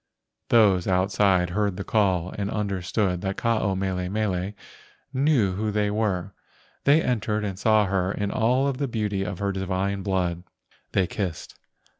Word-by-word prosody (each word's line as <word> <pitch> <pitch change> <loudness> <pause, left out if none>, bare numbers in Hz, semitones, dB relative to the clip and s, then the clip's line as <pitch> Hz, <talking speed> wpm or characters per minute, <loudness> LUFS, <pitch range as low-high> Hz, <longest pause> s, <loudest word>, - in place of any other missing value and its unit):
Those 100 -6 +4
outside 95 -1 +2
heard 100 -1 0
the 100 - -3
call 95 -5 +1
and 100 -1 -2
understood 100 -2 -1
that 95 0 -3
Ke - - -7
ao 110 -4 +2
mele 95 -1 -2
mele 100 -2 -1 0.6
knew 130 -7 +2
who 105 +3 -2
they 105 0 0
were. 100 -3 -1 0.5
They 150 +3 +5
entered 110 -3 -1
and 95 -2 -4
saw 110 -1 +4
her 95 -1 0
in 100 0 -2
all 130 +5 +2
the 140 +2 -2
beauty 105 -4 -2
of 95 -1 -3
her 100 +1 -1
high 95 - -4
divine 95 +1 -1
blood. 90 -3 -1 0.5
They 95 - +3
kissed. 90 -3 -4
100 Hz, 160 wpm, -25 LUFS, 95-110 Hz, 0.6 s, They